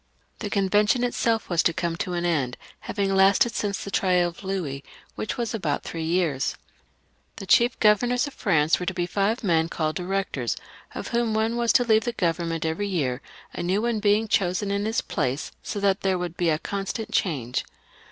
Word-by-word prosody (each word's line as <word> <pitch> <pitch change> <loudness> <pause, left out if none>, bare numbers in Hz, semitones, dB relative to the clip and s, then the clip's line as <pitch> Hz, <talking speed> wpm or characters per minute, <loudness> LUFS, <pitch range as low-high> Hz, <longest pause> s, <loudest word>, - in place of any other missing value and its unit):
The 205 - -4
Convention 205 +4 +2
itself 230 -2 0
was 175 -2 +2
to 170 - +2
come 170 -1 -2
to 180 - -3
an 175 0 -1
end, 140 -8 0 0.2
having 195 -2 -1
lasted 195 +4 +4
since 200 -2 -2
the 200 - -6
trial 180 -3 +2
of 170 - -13
Louis, 170 -8 -3 0.3
which 210 - -4
was 235 -1 -2
about 225 - -1
three 165 - -5
years. 160 -5 0 0.8
The - - -8
chief 240 +5 +4
governors 240 +4 +3
of 285 - -7
France 160 -7 +2
were 180 - -5
to 190 - -1
be 175 - 0
five 205 +6 0
men 165 -4 +2
called 155 -2 -1
Directors, 180 - -2 0.4
of - - -5
whom 235 -2 0
one 220 +2 +1
was 235 -1 +2
to 245 - +5
leave 220 -2 +3
the 240 - -1
Government 165 -4 -1
every 160 +6 -1
year, 140 -9 -1 0.3
and - - -4
a - - -2
new 195 +4 +1
one 235 -1 +1
to - - -4
be 210 +1 +3
chosen 195 0 +1
in 200 +1 0
his 225 +1 0
place, 130 +3 -2
so 205 - -4
that 200 0 +2
there 190 -1 +1
was 180 0 -2
to - - -21
be 175 -1 0
a 155 - +2
constant 200 +5 -4
change. 130 - 0
195 Hz, 205 wpm, -25 LUFS, 170-215 Hz, 0.8 s, to